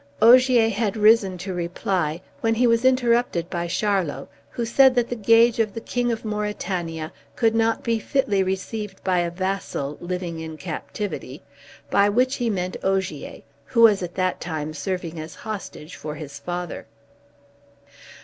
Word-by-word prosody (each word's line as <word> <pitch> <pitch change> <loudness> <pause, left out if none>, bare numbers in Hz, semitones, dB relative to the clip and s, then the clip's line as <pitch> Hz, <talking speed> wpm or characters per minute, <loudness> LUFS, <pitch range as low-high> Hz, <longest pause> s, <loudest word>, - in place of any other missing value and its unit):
Ogier 245 0 +6
had 220 0 -1
risen 210 -3 +4
to 185 +2 -5
reply, 175 -1 -2 0.2
when 225 0 +1
he 245 +2 +3
was 230 0 +3
interrupted 240 -8 +2
by 175 -1 -2
Charlot, 185 -6 -1 0.2
who 235 - -3
said 260 +2 +5
that 240 -1 +1
the 245 - -2
gage 230 +2 +4
of 215 -3 0
the - - -3
King 240 +1 -1
of 225 -1 -4
Mauritania 185 -6 -3 0.2
could 225 -2 +2
not 225 0 +1
fitly 230 0 0
be - - +4
received 190 +2 -4
by 185 -2 +2
a 175 0 0
vassal, 185 -5 -3
living 175 -2 -4
in 160 -1 -7
captivity; 165 -4 -6 0.5
by 200 +1 +4
which 255 +5 +2
he 240 -2 0
meant 185 -3 -2
Ogier, 190 0 -2 0.2
who 235 -3 +1
was 215 -4 +6
at 175 -1 -5
that 185 -1 -1
time 155 -2 -4
serving 170 +1 -4
as 155 +1 -8
hostage 200 -7 -7
for 150 0 -6
his 145 -3 -8
father. 175 +3 -5
195 Hz, 160 wpm, -23 LUFS, 175-230 Hz, 0.5 s, Ogier